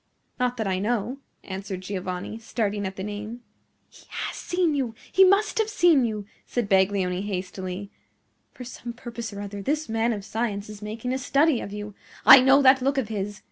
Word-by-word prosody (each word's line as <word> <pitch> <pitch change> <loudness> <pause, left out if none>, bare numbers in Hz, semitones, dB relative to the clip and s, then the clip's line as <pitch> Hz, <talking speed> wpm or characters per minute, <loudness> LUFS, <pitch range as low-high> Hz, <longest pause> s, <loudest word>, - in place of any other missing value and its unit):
"Not 250 0 0
that 220 - -1
I 190 -1 0
know," 235 +5 -1 0.2
answered 190 -1 -6
Giovanni, 185 +2 -5
starting 210 -3 -2
at 190 - -7
the 190 - -5
name. 210 +3 -6 0.5
"He - - -19
HAS - - -4
seen 355 -3 0
you! 255 -6 -2 0.2
he 385 - +6
must 400 +4 +3
have 440 -1 +1
seen 340 - +4
you!" 215 -3 -3 0.2
said 240 -4 -1
Baglioni, 190 -1 +2
hastily. 190 0 -5 0.6
"For 250 - -10
some 240 -1 -7
purpose 235 -2 -7
or 200 0 -7
other, 205 0 -6
this 300 +7 -1
man 225 +1 +1
of 205 -3 -4
science 215 -3 -3
is 210 -1 -9
making 220 +4 -4
a 260 - -1
study 275 +1 +2
of 200 - -7
you. 210 0 -6 0.3
I 265 - +11
know 270 +2 +5
that 260 0 +6
look 275 +2 +1
of 245 -5 -1
his! 205 -1 -4
220 Hz, 190 wpm, -25 LUFS, 200-255 Hz, 0.6 s, I